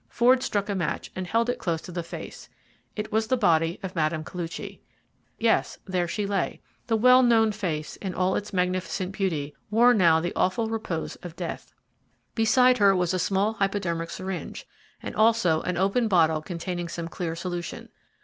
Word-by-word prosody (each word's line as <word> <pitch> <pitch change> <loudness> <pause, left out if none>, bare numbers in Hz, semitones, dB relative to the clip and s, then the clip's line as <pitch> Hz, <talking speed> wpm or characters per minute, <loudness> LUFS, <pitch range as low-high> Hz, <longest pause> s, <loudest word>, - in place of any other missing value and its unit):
Ford 250 +2 +4
struck 205 -5 -1
a 205 - -1
match 180 -5 -3
and 185 -1 -4
held 230 +4 +1
it 245 - -1
close 165 -2 -1
to 180 - -9
the 175 0 -3
face. 170 - -9 0.5
It 210 0 -4
was 220 +1 +1
the 255 - +2
body 165 -5 +2
of 185 -1 -5
Mme. 155 -1 0
Koluchy. 170 0 -6 0.6
Yes, 225 0 +1
there 180 -2 -1
she 205 +4 -2
lay. 195 -2 -1 0.3
The 225 - +2
well 250 +3 +6
known 225 -3 +4
face, 170 -8 -4
in 190 -3 -5
all 185 +1 +1
its 210 - -3
magnificent 185 0 -1
beauty, 160 -8 -2
wore 235 +4 +5
now 170 -7 +5
the 175 +2 -3
awful 220 +5 +1
repose 215 -8 -4
of 175 -2 -10
death. 175 -1 -6 0.6
Beside 250 +2 +4
her 200 -1 +5
was 180 0 +1
a 185 - 0
small 200 +4 +1
hypodermic 195 -5 -1
syringe, 190 0 -6 0.4
and - - -6
also 215 -8 +3
an 180 -1 -2
open 200 +6 +2
bottle 160 -5 +3
containing 175 +1 -4
some 170 0 -5
clear 170 -1 -4
solution. 175 0 -5
185 Hz, 180 wpm, -26 LUFS, 170-220 Hz, 0.6 s, well